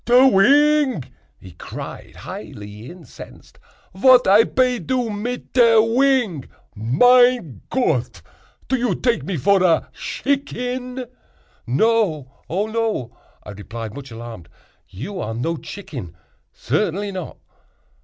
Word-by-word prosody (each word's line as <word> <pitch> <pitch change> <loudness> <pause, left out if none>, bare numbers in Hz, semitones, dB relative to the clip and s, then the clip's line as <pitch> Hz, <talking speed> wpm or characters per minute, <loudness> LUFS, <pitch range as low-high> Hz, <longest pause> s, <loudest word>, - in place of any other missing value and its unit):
"Te 250 +2 +6
wing!" 280 - +4 0.3
he 95 - -13
cried, - - -9
highly 105 +3 -9
incensed, 175 -2 -14 0.3
"vat 250 +6 +5
I 205 +4 +6
pe 250 -2 +1
do 250 -3 -2
mit 235 +4 -5
te 235 -3 +5
wing? 230 - +2 0.3
Mein 175 - +3
Gott! 130 - -1 0.4
do 265 - +1
you 245 0 0
take 240 -3 0
me 195 - -4
vor 195 +6 +3
a 175 -3 +2
shicken?" 255 -2 -3 0.6
"No—oh 165 - 0
no!" 220 - -2 0.3
I 105 - -9
replied, 110 +2 -8
much 135 +1 -9
alarmed, 115 -6 -10 0.4
"you 185 - -7
are 110 -6 -4
no 165 +9 -2
chicken—certainly 165 - -5
not." 185 -3 -7
200 Hz, 110 wpm, -21 LUFS, -, 0.6 s, Te